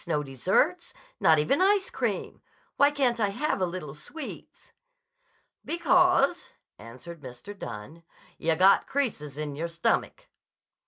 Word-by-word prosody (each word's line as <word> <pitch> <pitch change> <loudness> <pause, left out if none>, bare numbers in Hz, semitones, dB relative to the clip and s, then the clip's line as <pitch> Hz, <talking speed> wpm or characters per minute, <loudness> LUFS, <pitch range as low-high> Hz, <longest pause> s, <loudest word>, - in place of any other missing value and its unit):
No 150 -3 0
desserts. 190 - 0 0.2
Not 160 -1 +5
even 155 - +2
ice 390 0 +3
cream. - - -3 0.3
Why 285 - +5
can't 260 -5 0
I 205 -2 +2
have 245 +1 -2
a 185 - +2
little 170 -5 -6
sweets?" 270 - -10 0.9
"Because," 350 -1 +2 0.3
answered 150 +8 -11
Mr. 130 +10 -10
Dunne, 150 - -8 0.4
"yah 165 0 +1
got 190 +4 +5
creases 200 - -2
in 150 -2 -4
your 165 +4 -3
stomach." 170 0 -1
185 Hz, 125 wpm, -27 LUFS, -, 0.9 s, Not